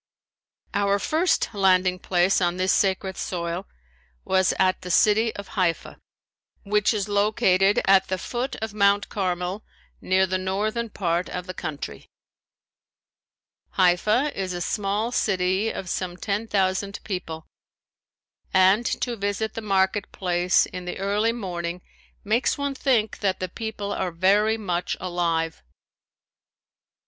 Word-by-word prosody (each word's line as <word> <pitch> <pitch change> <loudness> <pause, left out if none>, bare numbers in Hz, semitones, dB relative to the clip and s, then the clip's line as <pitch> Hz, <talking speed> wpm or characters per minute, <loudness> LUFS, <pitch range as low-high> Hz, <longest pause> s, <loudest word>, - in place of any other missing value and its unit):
Our 200 0 +2
first 320 - +1
landing 185 -2 +3
place 180 +1 +2
on 175 0 +1
this 185 +1 +2
sacred 190 -1 0
soil 170 +1 -3 0.6
was 190 0 +3
at 185 -1 +2
the 180 - -7
city 220 +5 +4
of 200 -1 -8
Haifa, 180 -4 -1 0.6
which 210 0 +2
is 210 -2 -1
located 205 -1 +3
at 195 -1 +5
the 185 - -1
foot 245 +7 -3
of 220 -2 -4
Mount 200 0 +3
Carmel 185 +1 -2 0.4
near 190 +1 +3
the 185 0 -1
northern 215 +5 -2
part 175 -3 -1
of 180 0 -5
the 185 - -6
country. 145 - -6 1.6
Haifa 210 +10 +2
is 190 -2 -3
a - - -3
small 205 +5 -1
city 190 -1 +1
of 190 - -5
some 180 0 -3
ten 205 +3 -2
thousand 195 0 0
people 165 -5 -5 1.1
and 190 +5 +4
to 240 -2 -1
visit 205 +1 -2
the 225 - -5
market 195 -1 +1
place 180 -1 +2
in 180 0 -8
the 180 - -5
early 205 +4 +1
morning 180 -6 -4 0.4
makes 225 +4 +1
one 280 -1 -2
think 245 -6 0
that 190 -2 0
the 185 - -3
people 205 0 -5
are 185 - -2
very 200 +6 +3
much 180 -5 -2
alive. 170 -2 -1
195 Hz, 135 wpm, -24 LUFS, 180-210 Hz, 1.6 s, at